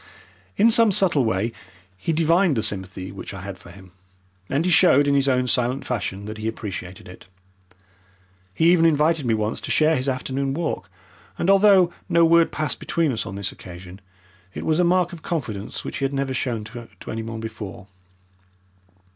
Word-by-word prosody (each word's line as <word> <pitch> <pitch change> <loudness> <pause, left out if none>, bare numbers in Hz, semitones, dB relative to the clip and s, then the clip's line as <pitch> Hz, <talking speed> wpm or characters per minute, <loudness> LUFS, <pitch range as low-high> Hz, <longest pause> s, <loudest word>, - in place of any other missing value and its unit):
In 230 +3 +5
some 225 -1 +6
subtle 180 -8 +2
way 110 0 0 0.4
he 95 - -3
divined 165 -1 +2
the 110 - 0
sympathy 95 -2 -4
which 100 +1 -8
I 95 - -8
had 95 -1 -8
for 90 - -15
him, 95 +1 -14 0.6
and 145 +5 0
he 180 - +1
showed 160 -5 +5
in 140 - +3
his 140 -1 +2
own 125 -1 +2
silent 125 +2 0
fashion 100 -5 -3
that 110 +1 -7
he 110 - -3
appreciated 95 -4 -6
it. 90 - -13 1.3
He 160 - +3
even 170 -2 +4
invited 155 -2 +2
me 115 - +2
once 110 0 -2
to - - -6
share 155 +1 +3
his 130 0 -1
afternoon 135 +1 -2
walk, 155 - -3 0.5
and 190 - +2
although 195 -3 +5 0.2
no 170 0 +5
word 170 0 +4
passed 155 -4 -2
between 165 -4 0
us 115 - -3
on 95 - -6
this 100 -1 -3
occasion, 90 +1 -11 0.5
it - - -5
was 160 +1 +1
a - - +4
mark 175 0 +2
of 165 - -9
confidence 110 - -4
which - - -5
he 140 - -1
had 135 - -2
never 135 -1 -1
shown 120 -4 -2
to 115 +2 -10 0.2
anyone 110 0 -5
before. 110 -3 -7
130 Hz, 185 wpm, -23 LUFS, 105-165 Hz, 1.3 s, some